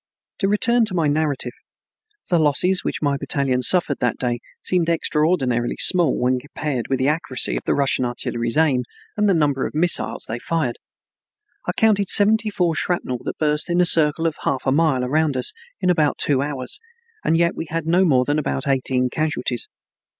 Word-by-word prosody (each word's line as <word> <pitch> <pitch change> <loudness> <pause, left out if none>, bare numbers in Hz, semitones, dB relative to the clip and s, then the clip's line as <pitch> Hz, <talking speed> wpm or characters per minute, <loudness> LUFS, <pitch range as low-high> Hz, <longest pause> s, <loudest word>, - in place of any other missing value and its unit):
To 195 - +1
return 235 +4 +3
to 200 -4 -5
my 165 -3 +1
narrative, 145 -4 0 0.8
the 175 - +4
losses 170 +5 +2
which - - -3
my 140 -1 +1
battalion 135 -2 -1
suffered 155 0 +3
that 125 - 0
day 120 -1 -2 0.2
seemed 175 -2 0
extraordinarily 150 -7 0
small 175 -7 +3
when 125 +1 +1
compared 140 -2 -4
with 135 - 0
the 130 - 0
accuracy 150 -4 0
of - - -4
the - - +1
Russian 135 -2 +1
artillery's 120 0 -2
aim 145 -6 +3 0.3
and 210 -1 +2
the 190 - +3
number 145 -4 +1
of - - -11
missiles 155 -8 0
they 115 +2 -4
fired. 155 -7 -2 0.9
I - - +1
counted 205 -3 +2
seventy 215 +1 +4
four 180 -5 0
shrapnel 155 -7 -2
that - - -4
burst 150 +1 0
in 175 +1 +1
a 180 - +4
circle 160 -1 +3
of 160 -2 -1
half 130 - -2
a 130 - +2
mile 145 -3 +2
around 150 +1 0
us 125 - +1 0.3
in 180 - +2
about 155 -4 +1
two 140 -3 +1
hours, 140 -3 -3 0.4
and 165 - +2
yet 170 0 +2
we - - -5
had 165 0 -3
no 175 +3 +3
more 130 -8 +3
than 145 +2 0
about 70 - -3
eighteen 130 -2 0
casualties. 140 -6 -2
150 Hz, 185 wpm, -21 LUFS, 130-170 Hz, 0.9 s, the